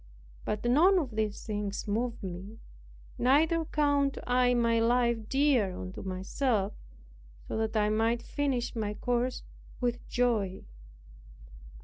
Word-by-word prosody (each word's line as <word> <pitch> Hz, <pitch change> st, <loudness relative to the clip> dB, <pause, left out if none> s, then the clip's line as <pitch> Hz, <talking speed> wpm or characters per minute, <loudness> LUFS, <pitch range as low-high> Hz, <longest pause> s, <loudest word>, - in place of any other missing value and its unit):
But 210 Hz, +2 st, -3 dB
none 330 Hz, +11 st, +5 dB
of 290 Hz, -8 st, -1 dB
these 215 Hz, -1 st, -2 dB
things 205 Hz, -1 st, -3 dB
move 230 Hz, +2 st, -2 dB
me; 190 Hz, +4 st, -7 dB, 0.6 s
neither 320 Hz, +6 st, +3 dB
count 285 Hz, -2 st, +1 dB
I 250 Hz, 0 st, +3 dB
my 230 Hz, -1 st, +2 dB
life 235 Hz, -1 st, +1 dB
dear 265 Hz, -9 st, +2 dB
unto 185 Hz, 0 st, -7 dB
myself, 195 Hz, +3 st, -1 dB, 0.7 s
so -, -, -4 dB
that 220 Hz, 0 st, -1 dB
I 210 Hz, 0 st, +2 dB
might 225 Hz, +2 st, +1 dB
finish 270 Hz, -5 st, -2 dB
my 210 Hz, -2 st, -2 dB
course 245 Hz, +2 st, -1 dB, 0.4 s
with 245 Hz, -1 st, -1 dB
joy." 225 Hz, -6 st, 0 dB
235 Hz, 120 wpm, -30 LUFS, 210-255 Hz, 0.7 s, none